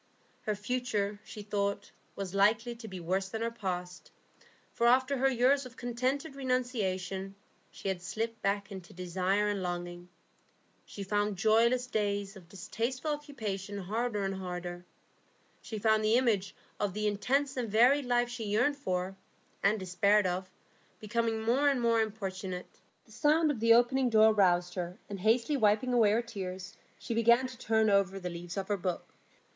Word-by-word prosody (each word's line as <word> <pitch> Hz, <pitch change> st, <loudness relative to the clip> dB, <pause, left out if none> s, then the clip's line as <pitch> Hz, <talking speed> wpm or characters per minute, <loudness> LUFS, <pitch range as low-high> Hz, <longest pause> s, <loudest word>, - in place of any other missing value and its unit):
Her 215 Hz, -, +1 dB
future, 210 Hz, -2 st, -2 dB
she 210 Hz, -1 st, -9 dB
thought, 200 Hz, -1 st, -2 dB, 0.2 s
was 195 Hz, -2 st, -5 dB
likely 215 Hz, +4 st, +3 dB
to 230 Hz, -1 st, -10 dB
be 190 Hz, -3 st, -7 dB
worse 190 Hz, +3 st, -1 dB
than 220 Hz, +2 st, -3 dB
her 230 Hz, -, -1 dB
past, 180 Hz, -5 st, -5 dB, 0.6 s
for 235 Hz, -, +2 dB
after 260 Hz, +3 st, +4 dB
her 270 Hz, +1 st, +3 dB
years 265 Hz, +3 st, +3 dB
of 250 Hz, -, -17 dB
contented 255 Hz, +4 st, -2 dB
renunciation, 200 Hz, -8 st, -2 dB, 0.3 s
she -, -, -8 dB
had 190 Hz, -2 st, -1 dB
slipped 220 Hz, +6 st, -4 dB
back 200 Hz, +1 st, -1 dB
into 190 Hz, -3 st, -9 dB
desire 185 Hz, +3 st, 0 dB
and 205 Hz, -2 st, -1 dB
longing; 175 Hz, 0 st, -5 dB, 0.8 s
she 200 Hz, -, -7 dB
found 205 Hz, 0 st, 0 dB
joyless 230 Hz, +5 st, +3 dB
days 205 Hz, -4 st, -2 dB
of 180 Hz, -3 st, -14 dB
distasteful 230 Hz, -, -3 dB
occupation 215 Hz, -10 st, -4 dB
harder 210 Hz, +2 st, -2 dB
and 195 Hz, 0 st, -1 dB
harder; 180 Hz, -1 st, -6 dB, 0.8 s
she 220 Hz, -, -6 dB
found 220 Hz, +1 st, +2 dB
the 215 Hz, +2 st, +3 dB
image 220 Hz, -7 st, +1 dB, 0.2 s
of 205 Hz, -2 st, -1 dB
the 215 Hz, 0 st, -1 dB
intense 265 Hz, +7 st, 0 dB
and 245 Hz, -3 st, -2 dB
varied 250 Hz, +7 st, +4 dB
life 245 Hz, 0 st, +2 dB
she 240 Hz, -2 st, -5 dB
yearned 245 Hz, +8 st, +1 dB
for, 185 Hz, -7 st, -2 dB, 0.5 s
and 210 Hz, +2 st, +2 dB
despaired 200 Hz, +3 st, +2 dB
of, 185 Hz, +1 st, -2 dB, 0.5 s
becoming 225 Hz, +1 st, -1 dB
more 265 Hz, +6 st, +3 dB
and 275 Hz, -2 st, +1 dB
more 230 Hz, -1 st, +3 dB
importunate. 190 Hz, -4 st, -5 dB, 0.3 s
The -, -, -21 dB
sound 300 Hz, +7 st, +3 dB
of 260 Hz, -, -4 dB
the 230 Hz, +1 st, +6 dB
opening 250 Hz, +2 st, +3 dB
door 220 Hz, -1 st, +6 dB
roused 180 Hz, -3 st, +3 dB
her, 180 Hz, -1 st, -4 dB
and 200 Hz, -, -5 dB
hastily 230 Hz, +8 st, +2 dB
wiping 220 Hz, +2 st, +2 dB
away 230 Hz, -4 st, +5 dB
her 225 Hz, +3 st, +2 dB
tears, 190 Hz, -5 st, -6 dB, 0.2 s
she -, -, -5 dB
began 235 Hz, +3 st, +4 dB
to 255 Hz, 0 st, -7 dB
turn 220 Hz, -2 st, +2 dB
over 195 Hz, -1 st, +2 dB
the 180 Hz, -1 st, -5 dB
leaves 175 Hz, +2 st, -7 dB
of 195 Hz, -1 st, -2 dB
her 205 Hz, -, +1 dB
book. 180 Hz, -2 st, -4 dB
210 Hz, 165 wpm, -31 LUFS, 190-240 Hz, 0.8 s, the